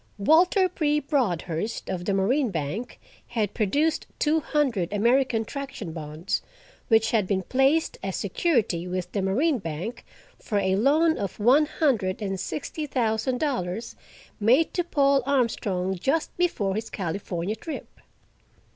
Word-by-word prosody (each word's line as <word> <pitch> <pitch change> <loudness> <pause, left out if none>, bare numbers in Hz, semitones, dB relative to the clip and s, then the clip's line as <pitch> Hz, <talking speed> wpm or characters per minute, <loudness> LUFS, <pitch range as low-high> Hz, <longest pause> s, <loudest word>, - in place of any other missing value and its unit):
Walter 350 - +4
P. 300 -4 +1
Broadhurst, 215 - -1
of 180 -1 -3
the 200 - 0
Marine 245 +7 +2
Bank, 175 +7 -4 0.3
had 215 -4 -1
produced 285 +9 +1
two 315 +1 +2
hundred 260 - 0
American 235 +2 +2
Traction 270 - -6
bonds, 155 +2 -3 0.5
which 225 -1 +3
had 215 -5 +2
been 190 -1 0
placed 270 - +2
as 195 -1 -3
security 200 - 0
with 180 0 -3
the 200 - -1
Marine 255 - +1
Bank 170 +7 -5 0.4
for 210 - -2
a 190 -1 +2
loan 305 +9 +3
of 200 -3 -4
one 265 +8 +5
hundred 230 - 0
and 195 -3 -3
sixty 300 - -4
thousand 245 -1 0
dollars, 230 - -2 0.4
made 250 +10 +3
to 355 - +1
Paul 280 -4 +3
Armstrong, 210 -8 0
just 285 - 0
before 275 - 0
his 220 +3 -4
California 185 +1 -3
trip. 315 +8 -8
225 Hz, 140 wpm, -26 LUFS, 190-280 Hz, 0.5 s, one